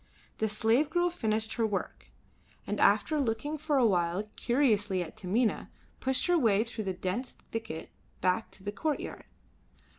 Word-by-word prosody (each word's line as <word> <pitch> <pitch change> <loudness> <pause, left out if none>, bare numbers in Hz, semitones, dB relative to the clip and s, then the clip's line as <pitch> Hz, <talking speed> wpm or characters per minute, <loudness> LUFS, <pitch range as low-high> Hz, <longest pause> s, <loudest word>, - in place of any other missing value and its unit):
The 220 - +1
slave 225 +7 +3
girl 350 +1 +2
finished 220 -8 -1
her 230 -2 +1
work, 205 -2 -4 0.6
and - - -2
after 310 -1 +4
looking 280 +4 -1
for 295 -1 +1
a 255 - +5
while 180 -1 +2
curiously 215 -8 +2
at 160 - -10
Taminah, 215 +3 0 0.3
pushed 260 0 +1
her 355 -1 +4
way 220 -5 +4
through 230 -2 -6
the 190 - -1
dense 185 +8 -3 0.2
thicket 220 -8 -5 0.3
back 185 +4 +1
to 190 - -11
the 205 - -2
courtyard. 295 +9 -3
225 Hz, 155 wpm, -30 LUFS, 200-265 Hz, 0.6 s, a